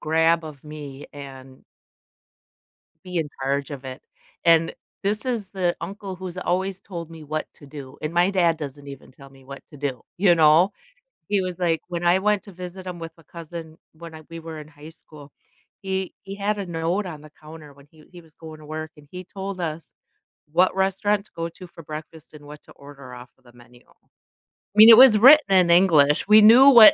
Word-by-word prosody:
grab 160 +1 +1
of 150 -3 -11
me 145 -2 -10
and 135 -2 -12 1.4
be 180 -1 -7
in 155 -2 -2
charge 140 +2 -2
of 135 -2 -8
it. 130 -1 -8 0.4
And 165 -1 +3 0.3
this 210 +3 -1
is 230 -6 -3
the 180 -3 -1
uncle 200 -1 -7
who's 185 -1 -8
always 190 +1 -2
told 170 -5 -9
me 160 -2 -12
what 155 +1 -4
to 145 - -16
do, 135 -2 -11
and 155 +2 -4
my 175 +3 +2
dad 170 -4 +1
doesn't 145 -2 -9
even 140 -2 -11
tell 140 +1 -16
me 135 -1 -19
what 140 +1 -10
to 150 - -13
do. 135 -4 -4 0.2
You 185 -3 +4
know? 160 +5 +5 0.6
He 200 -2 +1
was, 180 -1 -5
like, 165 -3 0
when 175 -1 -4
I 180 +2 +4
went 210 0 0
to 200 - -13
visit 185 +1 -9
him 175 -1 -7
with 165 0 -8
a 165 - -20
cousin 165 0 -10 0.2
when 165 0 -12
I 155 - -11
we 165 - -8
were 160 -1 -9
in 150 - -11
high 145 +1 -14
school, 150 -3 -16 0.5
he 190 -1 -4
he 195 0 -8
had 205 +1 -2
a 195 - -4
note 170 +4 -2
on 155 -4 -9
the 155 - -14
counter 155 -2 -13
when 140 0 -20
he 155 -1 -20
he 175 -1 -13
was 160 -2 -24
going 160 -1 -12
to 150 - -14
work, 155 0 -7
and 145 -1 -18
he 180 0 -8
told 195 0 -7
us, 160 0 -6 0.6
what 180 +4 +2
restaurant 195 +2 0
to - - -22
go 165 0 -4
to 180 +2 -13
for 165 -1 -14
breakfast 155 +1 -10
and 145 -1 -14
what 150 0 -12
to - - -19
order 140 -2 -13
off 125 0 -12
of 130 - -34
the 120 - -19
menu. 120 0 -19
I - - -29 0.7
mean, 220 +2 +10
it 230 - +10
was 250 -5 +8
written 275 -1 +7
in 180 -2 +4
English. 160 -5 +4
We 215 +1 +7
knew 245 +6 +8
what 225 -5 +9
165 Hz, 215 wpm, -23 LUFS, 150-190 Hz, 1.4 s, mean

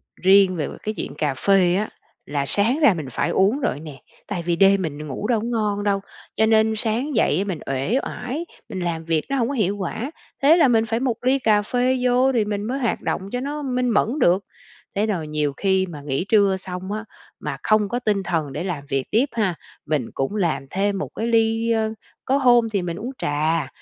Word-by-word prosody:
Riêng 190 0 +5
về 155 - -2
về - - -8
cái 215 - -2
chuyện - - -5
cà 150 -3 0
phê 180 +4 +3
á, 210 +3 -1 0.4
là 140 -1 -2
sáng 225 - +1
ra 290 -10 +6
mình 155 -6 -5
phải - - -1
uống 205 +8 +2
rồi 260 - 0
á - - -9
nè. 145 -4 -10 0.3
Tại 180 -5 -3
vì 170 0 0
đêm 195 +2 +5
mình 150 -2 -4
ngủ 145 +9 -4
đâu 230 -2 +2
có 215 - -4
ngon 210 -3 -1
đâu, 200 -1 +1 0.4
cho 220 - +3
nên 220 0 +4
sáng 235 +6 -1
dậy 195 -7 +3
á 195 - +1
mình 185 -6 -4
uể 135 - 0
oải, 275 +8 -4 0.2
mình 185 - -5
làm 170 -2 -2
việc 160 -2 0
nó 275 - 0
hông 235 - +1
có 280 - -2
hiệu 205 -5 0
quả. 220 - -4 0.3
Thế 300 +5 +6
là 310 -6 +5
mình 225 -2 +3
phải 225 +1 -1
một 245 -3 -2
ly 260 +2 +3
cà 215 -4 +3
phê 250 +4 +1
vô 250 +2 +4
thì 230 -4 +1
mình 205 -1 -2
mới 255 +6 -2
hoạt 240 -4 -1
động - - -2
cho 245 - -2
nó 290 +3 -4
minh 250 -2 0
mẫn 220 -1 +3
được. 185 -2 +3 0.5
Thế 205 +2 +2
rồi 180 -8 -2
nhiều 150 -2 -1
khi 190 -1 +2
mà 150 -3 -8
nghỉ 140 +4 -2
trưa 200 -3 +4
xong 185 +1 -6
á, 215 +1 -4 0.3
mà - - -4
không 215 -2 +3
có 245 - -1
tinh 210 -5 0
thần 160 -6 -2
để - - -3
làm 175 -7 -3
việc 135 -2 0
tiếp 230 +5 +4
ha, 200 -7 0 0.3
mình 150 -5 0
cũng 135 +9 -2
làm 170 -8 0
thêm 200 +3 0
một 195 - -4
cái 225 - -2
ly, 225 0 +2
ơ 220 -1 +1 0.3
có 270 +2 +2
hôm 240 -4 +4
thì 200 -4 -1
mình 170 -1 -4
uống 240 +6 -5
trà, 155 0 0
205 Hz, 235 wpm, -22 LUFS, 175-235 Hz, 0.5 s, ra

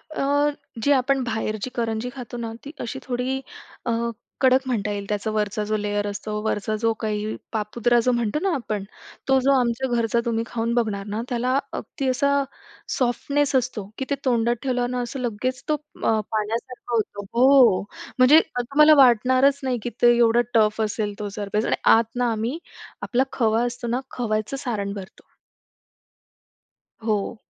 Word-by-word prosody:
अ, 285 +1 +2 0.3
जी 285 - +3
आपण 265 +1 +1
बाहेरची 220 0 -3
करंजी 230 0 -2
खातो 245 -2 -7
ना, 230 -1 -4
ती 290 - -7
अशी 265 +3 -4
थोडी 260 +1 -2 0.4
अ, 235 - 0 0.5
कडक 260 0 +5
म्हणता 215 -4 -1
येईल. 200 -1 -4
त्याचा 210 +1 -1
वरचा 210 0 -1
जो 215 0 0
लेयर 205 0 -1
असतो 210 +1 -5
वरचा 215 0 -1
जो 225 0 +3
काही 215 0 -2 0.2
पापुद्रा 235 +3 +1
जो - - +5
म्हणतो 240 +3 0
ना 390 - +1
आपण, 215 -5 -3 0.4
तो 265 0 +4
जो 275 - +5
आमच्या 245 +2 0
घरचा 230 0 +1
तुम्ही 230 -1 0
खाऊन 230 0 -2
बघणार 215 -4 0
ना, 220 - -1
त्याला 250 +2 +1 0.2
अगदी 270 - -5
असा 280 +2 +2 0.7
सॉफ्टनेस 275 +3 0
असतो 240 -6 -1
की 265 - -3
ते 280 - +1
तोंडात 240 -1 +2
ठेवलं 250 -2 0
ना, 250 - -1
असं 245 +3 -5
लगेच 250 +2 -2
तो - - +4 0.3
अ, 220 -1 +3 0.2
पाण्यासारखं 235 +3 -3
होतो. 205 -2 -2
हो. 250 -4 +6 0.4
म्हणजे 265 +5 +8
असं 245 -6 +1
तुम्हाला 300 +2 +7
वाटणारच 260 +4 +4
नाही 250 -3 -1
की 240 - -2
ते 240 0 +6
एवढं 235 0 +4
टफ 215 -1 +3
असेल 210 -1 -1
तो 205 -1 -3
सरफेस 210 +2 -1
आणि - - +1 0.2
आत 225 +1 -2
ना 245 -1 +1
आम्ही, 230 +7 -2 0.4
आपला 255 +2 +1
खवा 225 -1 +2
असतो 240 0 -4
ना, 245 +2 0
खव्याचं 215 +2 -2
सारण 200 -4 -2
भरतो. 195 -2 -10 1.8
हो. 215 +1 -1
235 Hz, 165 wpm, -23 LUFS, 215-255 Hz, 1.8 s, म्हणजे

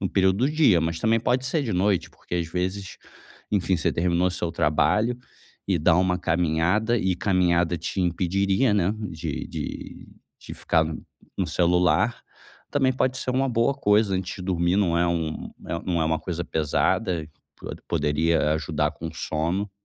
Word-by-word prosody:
no 95 - -1
período 95 0 +2
do - - 0
dia, 150 - +4
mas 80 0 -1
também 115 0 +2
pode 125 +2 0
ser 150 +2 0
de 115 - -2
noite, 95 +1 +1
porque - - -8
às 85 -2 -2
vezes, 95 +3 -3 0.5
enfim, 95 -3 +1
você - - 0
terminou 90 +1 +1
seu 85 -2 -3
trabalho 105 +10 +2 0.5
e 90 -3 +2
dá 80 - +4
uma 90 0 +2
caminhada, 90 +7 +1
e 95 -2 0
caminhada 90 -2 +1
te 90 +4 -3
impediria, 95 +6 +1
né, 100 0 +2 0.2
de 80 -3 -5
de - - -7 0.3
de - - -9
ficar 80 0 +1 0.5
no - - 0
celular. 90 +5 +2 0.5
Também 135 -2 +2
pode 130 0 0
ser 130 - -2
uma 135 +1 +1
boa 120 +3 +1
coisa 105 -3 +2
antes 95 0 -3
de 90 - -8
dormir, 90 0 +1
não 90 -5 +2
é 85 - +2
um 85 -2 -2 0.3
não 85 -3 0
é - - +1
uma 80 0 +1
coisa 85 0 -4
pesada, 80 +2 0 0.3
po - - -8 0.2
poderia 75 +1 +1
ajudar 75 -1 -1
com 80 - -7
o 80 - -10
sono. 85 +7 -2
90 Hz, 170 wpm, -25 LUFS, 85-105 Hz, 0.5 s, dia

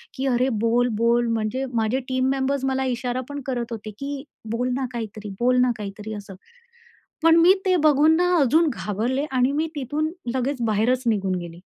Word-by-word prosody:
की 265 - -3
"अरे! 255 +1 +2
बोल, 230 +3 +2
बोल." 235 +2 +2
म्हणजे 225 +4 -1
माझे 225 +3 +1
टीम 260 0 +1
मेंबर्स 270 0 0
मला 265 0 0
इशारा 250 +1 -3
पण 285 0 -5
करत 240 -2 -3
होते 215 -1 -6
की 280 0 -5 0.3
"बोल 245 +2 -1
ना 265 -1 -1
काहीतरी. 215 -2 -6
बोल 250 +1 +3
ना 250 -1 +3
काहीतरी," 210 +1 -6
असं. 200 -2 -10 0.9
पण 330 0 +6
मी 350 +3 +7
ते 370 -1 +3
बघून 305 +1 +5
ना 360 0 +2
अजून 310 +4 +4
घाबरले 235 +9 -2
आणि 255 +1 +2
मी 315 +2 0
तिथून 295 +4 -2 0.2
लगेच 260 0 -1
बाहेरच 235 +5 +1
निघून 195 -4 +1
गेले. 170 0 -9
250 Hz, 180 wpm, -23 LUFS, 220-275 Hz, 0.9 s, मी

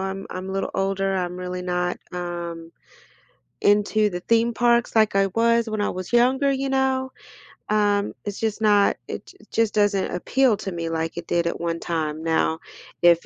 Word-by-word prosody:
I'm 195 0 -4
I'm 185 +1 -5
a - - -4
little 195 0 -2
older, 195 0 0
I'm 180 -1 -2
really 180 0 -5
not, 180 0 -1
um, 170 -2 -5 0.9
into 210 +1 +3
the 180 -2 -4
theme 230 +3 +2
parks, 235 0 +2
like 215 -2 +4
I 195 0 +4
was 230 +3 +2
when 215 -1 -2
I - - +1
was 185 +3 -6
younger, 260 +3 +4
you 270 0 -1
know? 265 -1 +1 0.6
Um, 205 -1 +2
it's 205 -1 -5
just 220 -1 -2
not 205 -2 +4
it - - -6
j - - -16
just 225 -2 +1
doesn't 205 -2 +1
appeal 245 +6 +2
to 195 - -5
me 170 -1 -3
like 165 0 -3
it 170 - -6
did 170 -1 +1
at - - -3
one 170 -1 -2
time. 155 -2 -3
Now, 160 0 +1 0.4
if 170 -1 +5
195 Hz, 185 wpm, -23 LUFS, 175-225 Hz, 0.9 s, if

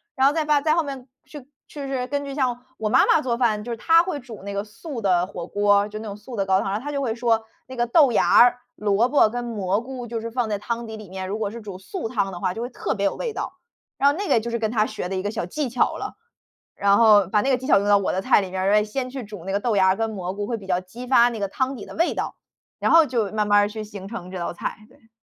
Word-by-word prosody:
然 265 0 +4
后 285 - +3
再 320 0 0
发 300 -1 +3
再 310 +1 +2
后 335 - +2
面 270 -3 -7 0.2
去 295 - -10 0.3
去 285 -2 -7
是 260 -2 -2
根 285 +1 -2
据 275 -1 -6
像 250 -3 -1
我 215 -1 -2
妈 260 +4 +5
妈 320 - +4
做 240 -5 -1
饭， 220 -4 +1
就 240 - -6
是 230 - -3
她 330 +8 +5
会 360 -5 -3
煮 240 -5 -11
那 200 0 -5
个 200 0 -2
素 230 +5 -8
的 180 -3 +2
火 175 -2 -7
锅， 205 0 +3
就 215 0 -7
那 220 - -7
种 200 -1 -6
素 225 +4 -10
的 200 -3 0
高 190 0 +3
汤。 200 +2 -2
她 290 +3 -5
就 280 -1 -2
会 230 -5 -1
说： 230 -2 +1 0.2
“那 260 - -9
个 240 0 +1
豆 280 +1 +5
芽 - - +4
儿、 245 +1 +6 0.2
萝 210 +2 +2
卜 270 -5 +4
跟 245 +2 -4
蘑 205 -4 -1
菇， 250 0 -7
就 235 -1 -4
是 230 +1 -5
放 235 -1 -1
在 205 - -1
汤 235 +3 -4
底 220 -1 -7
里 215 -1 -10
面。 190 0 -5
如 210 +2 -3
果 210 -2 -1
是 230 +3 -8
煮 200 -3 -8
素 225 - -5
汤 200 -5 -1
的 175 - -6
话， 180 - 0
就 225 - -6
会 240 - -3
特 245 - -3
别 200 -1 -1
有 200 - +1
味 475 - -3
道。” - - -5 0.4
然 280 - +5
后 285 - -1
那 405 +1 -3
个 - - +4
就 235 - -4
是 235 - -1
跟 220 -1 0
她 215 -2 +2
学 215 -4 -5
的 190 - -4
一 185 - -1
个 205 - -1
小 215 -4 -3
技 290 - -3
巧 245 +1 +1
了， - - -5 0.6
然 200 0 +3
后 210 -3 +6
把 210 +3 +2
那 265 - 0
个 260 - +3
技 255 - -8
巧 200 - +5
用 200 - -2
到 205 0 +6
我 200 - 0
的 190 - -1
菜 200 - +4
里 190 - -5
面 190 0 -2
儿。 195 +1 +2
诶， 210 0 +5
先 250 +5 -4
去 260 0 -6
煮 205 -5 -10
那 195 - -3
个 200 - +1
豆 225 -3 0
芽 190 -1 +5
儿 190 - +4
跟 225 +2 -1
蘑 185 -4 -4
菇， 205 +1 -4
会 230 +2 -2
比 195 -3 -12
较 180 -1 +1
激 230 +7 -10
发 245 -2 +5
那 230 -2 -6
个 200 - -1
汤 260 +6 -2
底 205 - -8
的 - - -11
味 340 +2 +1
道， - - -3 0.4
然 - - +1
后 330 -1 +7
就 230 -7 -1
慢 215 -1 0
慢 205 0 +5
儿 205 - +1
去 215 +1 -6
形 200 -2 -9
成 190 -6 -7
这 185 - -6
道 170 - -3
菜， 175 - -4
对。 225 - -24
225 Hz, 335 characters per minute, -23 LUFS, 200-255 Hz, 0.6 s, 后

